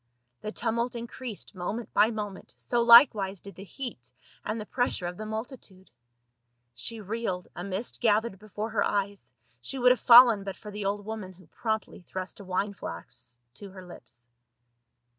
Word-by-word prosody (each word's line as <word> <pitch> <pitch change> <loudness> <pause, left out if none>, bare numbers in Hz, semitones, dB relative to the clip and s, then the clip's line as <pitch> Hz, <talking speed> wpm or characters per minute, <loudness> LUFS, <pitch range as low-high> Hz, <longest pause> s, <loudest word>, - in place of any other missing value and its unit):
The 215 - -4
tumult 235 +2 -1
increased 235 -2 -7
moment 200 +5 -5
by 210 +2 +5
moment, 210 -4 -6
so 240 -1 0
likewise 235 -5 +7
did 200 +2 -11
the 190 - -10
heat 200 - -8 0.3
and 215 +2 -3
the 210 - -5
pressure 245 -6 -1
of 175 +1 -4
the 215 +3 -7
multi 220 +5 -4
tude. 190 -4 -16 0.8
She 125 - -4
reeled, 205 -3 -3
a 175 - -5
mist 200 +4 -4
gathered 215 -3 +2
before 215 +1 -5
her 210 -2 +2
eyes, 200 -4 -2 0.3
she 265 - -2
would 250 0 +5
have 250 - +3
fallen 235 -4 +8
but 195 -1 -5
for 210 - -10
the 205 -1 -5
old 205 +1 -2
woman 215 -4 -6
who 185 0 -19
promply 220 +4 -3
thrust 185 +2 -6
a - - -9
wine 195 +2 -1
flask 120 -8 -8
to 200 +9 -10
her 185 -1 -11
lips. 120 -8 -14
205 Hz, 175 wpm, -28 LUFS, 190-230 Hz, 0.8 s, fallen